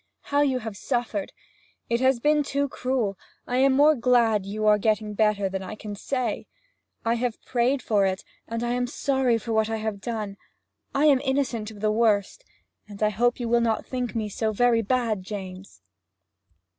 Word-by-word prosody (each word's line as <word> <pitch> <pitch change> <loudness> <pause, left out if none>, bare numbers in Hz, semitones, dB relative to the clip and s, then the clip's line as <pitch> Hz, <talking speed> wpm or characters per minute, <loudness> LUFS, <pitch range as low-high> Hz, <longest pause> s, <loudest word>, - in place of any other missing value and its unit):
'How 285 0 +1
you 270 -3 +2
have 220 -4 -6
suffered! 230 -2 -2 0.6
It 235 0 +1
has 260 -1 +3
been 300 +4 +3
too 280 0 -1
cruel. 250 -8 -2 0.3
I 250 - -1
am 270 +1 +4
more 295 +3 +6
glad 235 -6 +2
you 215 +2 -3
are 210 0 +5
getting 215 0 0
better 210 -2 +2
than 190 0 -4
I 190 +3 -6
can 210 -1 -7
say. 245 0 -3 0.6
I 230 - +3
have 240 -1 -2
prayed 255 +2 +1
for 205 -3 +2
it 190 0 -3 0.2
and 230 +1 -3
I 240 - -1
am 245 0 0
sorry 265 -2 +1
for 225 +1 -4
what 220 0 +2
I 225 - -1
have 215 -2 -4
done; 215 -4 -4 0.6
I 285 +2 +3
am 280 -4 +5
innocent 265 -6 -1
of 210 -2 -12
the 215 0 +2
worst, 215 - +1 0.5
and 205 +1 -5
I 210 - +4
hope 240 +4 +1
you 240 - -2
will 235 +1 +3
not 225 -1 0
think 250 -2 -4
me 220 -2 -1
so 220 +2 -1
very 235 +1 +3
bad, 225 -2 0
James!' 190 -1 -8
230 Hz, 190 wpm, -25 LUFS, 210-250 Hz, 0.6 s, more